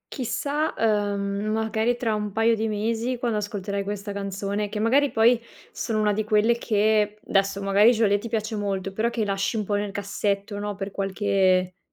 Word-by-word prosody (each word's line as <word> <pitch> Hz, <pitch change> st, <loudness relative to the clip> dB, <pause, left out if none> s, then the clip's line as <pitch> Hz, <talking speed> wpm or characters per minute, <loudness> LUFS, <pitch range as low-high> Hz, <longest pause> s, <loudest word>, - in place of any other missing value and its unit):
Chissà, 280 Hz, +5 st, -1 dB
ehm, 205 Hz, -2 st, 0 dB
magari 220 Hz, +2 st, 0 dB
tra 230 Hz, -3 st, 0 dB
un 210 Hz, -1 st, -2 dB
paio 225 Hz, +3 st, +3 dB
di 220 Hz, 0 st, -1 dB
mesi, 225 Hz, +4 st, -1 dB
quando 235 Hz, -3 st, -1 dB
ascolterai 200 Hz, -1 st, -3 dB
questa 205 Hz, 0 st, -5 dB
canzone, 200 Hz, +1 st, -3 dB
che 210 Hz, -, -5 dB
magari 270 Hz, +6 st, +3 dB
poi 235 Hz, +1 st, +4 dB, 0.3 s
sono 220 Hz, -2 st, -2 dB
una 210 Hz, -1 st, +2 dB
di 215 Hz, +2 st, -1 dB
quelle 215 Hz, +2 st, +3 dB
che, 210 Hz, -1 st, +2 dB
adesso 195 Hz, 0 st, 0 dB
magari 200 Hz, +4 st, +5 dB
Geolier 210 Hz, -3 st, +2 dB
ti 230 Hz, +3 st, -7 dB
piace 220 Hz, 0 st, -2 dB
molto, 195 Hz, -2 st, -3 dB
però 220 Hz, +4 st, 0 dB
che 230 Hz, -2 st, -2 dB
lasci 195 Hz, +3 st, -1 dB
un 210 Hz, -, -1 dB
po' 205 Hz, -, -2 dB
nel 205 Hz, 0 st, 0 dB
cassetto, 200 Hz, 0 st, -2 dB
no, 205 Hz, 0 st, -3 dB
per 195 Hz, 0 st, -5 dB
qualche, 190 Hz, -2 st, +1 dB
210 Hz, 180 wpm, -25 LUFS, 200-225 Hz, 0.3 s, magari